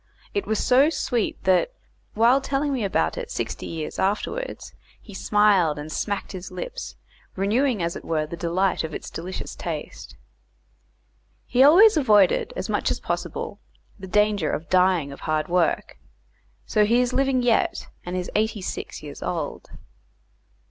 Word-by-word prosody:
it 405 - -2
was 220 - 0
so 265 +8 +4
sweet 245 -8 -2
that, 190 - +2 0.4
while 240 +5 +4
telling 275 +1 -1
me 250 -4 -1
about 200 - 0
it 485 -1 -6
sixty - - -4
years 160 -2 -5
afterwards, 215 - -2 0.3
he 210 - -14
smiled 195 -6 +3
and 150 +1 -7
smacked 200 +4 -3
his 185 -1 -7
lips, - - -6 0.4
renewing 215 +2 +1
as 170 0 -2
it - - -7
were 155 -2 -1
the 155 - -7
delight 175 +3 0
of 160 -1 -5
its - - -7
delicious 180 +3 -6
taste. - - -6 1.3
He 250 - +2
always 355 +9 +8
avoided, 210 - +4
as - - -3
much - - 0
as - - -1
possible, - - -4 0.4
the 190 - -8
danger 210 -4 +2
of 160 - -4
dying 180 -5 +3
of 140 - -10
hard 155 -1 -1
work, 175 -1 0 0.7
so 210 - +2
he 230 +4 +3
is 250 0 +1
living 265 -2 +2
yet, 235 -2 +1 0.2
and 180 +1 -4
is 180 - -4
eighty 215 -2 0
six - - -6
years - - -9
old. - - -4
210 Hz, 155 wpm, -24 LUFS, 180-260 Hz, 1.3 s, always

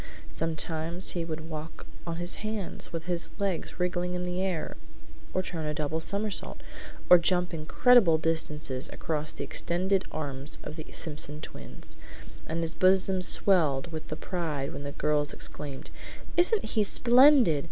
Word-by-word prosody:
Sometimes 165 - -1
he 170 - -2
would 160 -1 -5
walk 160 0 -7 0.2
on 165 - -2
his 175 +1 -2
hands, 215 -3 -4
with 165 -2 -4
his 175 -1 -1
legs 195 -4 -2
wriggling 180 0 -1
in 180 - -2
the 180 +1 -2
air, 185 -4 -2 0.6
or 185 - 0
turn 165 -4 -4
a 150 - -2
double 155 +1 -1
somersault, 200 +5 -2 0.5
or 180 - +9
jump 180 +1 +2
incredible 165 +3 +5
distances 150 -4 -1
across 155 -1 -2
the - - -6
extended 190 +3 +1
arms 145 -2 -4
of 150 - -7
the 155 -1 -8
Simpson 150 -1 -4
twins; 65 - -10 0.5
and 165 +1 -2
his 165 0 -2
bosom 190 0 +4
swelled 165 -6 +2
with 155 -1 -6
pride 155 -7 -3
when - - -6
the 140 0 -5
girls 150 0 0
exclaimed, 140 -3 -4 0.4
"Isn't 360 +5 +3
he 215 0 +1
splendid!" 245 - +6
165 Hz, 150 wpm, -28 LUFS, 155-185 Hz, 0.6 s, or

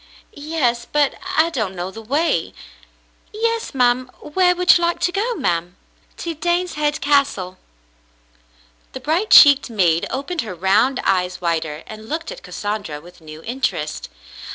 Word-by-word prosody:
"Yes, 285 -6 -1
but 295 -2 +2 0.2
I 325 +2 +4
don't 215 - -2
know 180 +1 -4
the 225 - -9
way." 285 +9 -1 0.8
"Yes, 455 -5 -2
ma'm. 250 0 +2
Where 360 +3 +2
would 360 0 +5
you 345 - +1
like 340 0 0
to 355 - +1
go, 450 +6 -1
ma'm?" 175 - -1 0.4
"To 335 - -4
Daneshead 320 -3 -1
Castle." 275 -11 +1 1.3
The 260 - -6
bright 325 +11 -1
cheeked 285 -3 +8
maid 175 -7 +1
opened 295 +6 -3
her 200 -5 -7
round 205 +9 +2
eyes 185 -1 0
wider 165 -3 -2
and 215 0 -11
looked 330 +8 -4
at - - -9
Cassandra 205 - -5
with 175 +2 -16
new 155 0 -11
interest. 230 - -3
255 Hz, 145 wpm, -20 LUFS, -, 1.3 s, cheeked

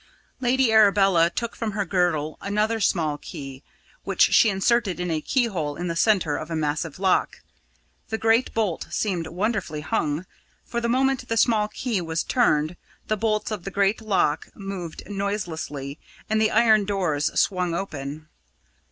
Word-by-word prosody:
Lady 255 -1 +2
Arabella 195 -5 +5
took 235 +5 -4
from 225 -3 -3
her 200 -1 -1
girdle 170 -4 0
another 210 +3 0
small 160 -7 +1
key, 135 -2 -8 0.4
which - - +3
she 225 - +6
inserted 195 0 +1
in 180 -1 -2
a 155 -1 -1
keyhole 185 - -1
in 175 +2 -4
the 170 - -2
centre 180 -6 +2
of 155 - -6
a 165 - -2
massive 150 0 -2
lock. 190 -1 +1 0.7
The 220 - -1
great 225 +3 +2
bolt 210 -7 -1
seemed 180 -6 -1
wonderfully 185 -4 -2
hung, 160 -3 -1 0.4
for 235 - -3
the 235 - -1
moment 260 0 +1
the 230 - -1
small 220 -2 +3
key 215 -1 -2
was 165 -1 -2
turned, 165 -9 +1 0.3
the 215 - +2
bolts 215 0 -1
of 210 -5 -4
the 195 - -4
great 200 +2 +1
lock 195 -8 +1
moved 195 -5 -6
noiselessly 170 -8 -4 0.3
and 220 0 +1
the 220 - +4
iron 220 -2 +4
doors 180 -8 0
swung 180 -3 +1
open. 155 -4 -5
195 Hz, 160 wpm, -24 LUFS, 160-220 Hz, 0.7 s, she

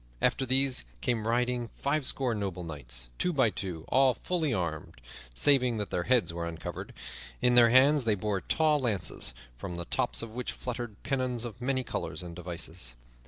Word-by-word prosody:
After 130 - +1
these 130 - +4 0.2
came 115 - 0
riding 120 0 +1
fivescore 135 -3 +1
noble 95 -4 -3
knights, - - -5
two 180 - +1
by 130 -9 +3
two, 90 -6 -5
all 130 0 +4
fully 165 -5 -1
armed, 85 -8 -3 0.4
saving 125 - +5
that 105 -1 -4
their 85 - -1
heads 125 -9 +2
were 85 0 -3
uncovered. 80 -1 -6 0.5
In 125 0 +3
their 120 -1 +7
hands 135 +4 +6
they 110 -2 +3
bore 100 -1 -1
tall 155 - +2
lances, 100 - -2 0.2
from 90 - -5
the 85 0 -4
tops - - 0
of 115 - -7
which 125 +2 -4
fluttered 120 -4 -6
pennons 130 -3 -1
of 120 0 -8
many 130 +1 0
colors 115 - -4
and 85 -1 -8
devices. 85 -6 -5
115 Hz, 170 wpm, -30 LUFS, 90-130 Hz, 0.5 s, their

